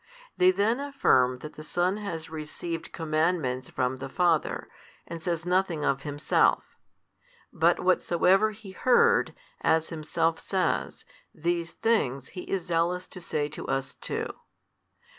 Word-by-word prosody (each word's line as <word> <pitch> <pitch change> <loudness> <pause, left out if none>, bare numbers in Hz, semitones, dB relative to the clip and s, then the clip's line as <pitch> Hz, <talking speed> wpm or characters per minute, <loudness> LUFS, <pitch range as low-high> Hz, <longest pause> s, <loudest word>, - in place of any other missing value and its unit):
They 180 - +5
then 205 +6 +2
affirm 130 - +2
that 150 - -8
the 155 - -10
Son 180 +5 0
has 170 -7 -5
received 160 +2 -5
commandments 155 -5 0
from 130 0 -1
the 135 - -6
Father, 170 0 +1 0.4
and 170 -1 -7
says 170 -1 -2
nothing 180 -4 +1
of 135 0 +1
Himself: 145 0 +1 0.8
but - - +3
whatsoever 190 +5 +3
He 210 -2 -11
heard, 360 - +3 0.3
as 160 0 +2
Himself 165 +1 -1
says, 190 -2 -1 0.3
these 170 +1 -1
things 140 - 0
He 180 - -8
is 190 -3 -1
zealous 175 +1 0
to 185 - -10
say 150 -3 -1
to 150 - -8
us 135 0 -2
too. - - -4
170 Hz, 135 wpm, -27 LUFS, 150-185 Hz, 0.8 s, They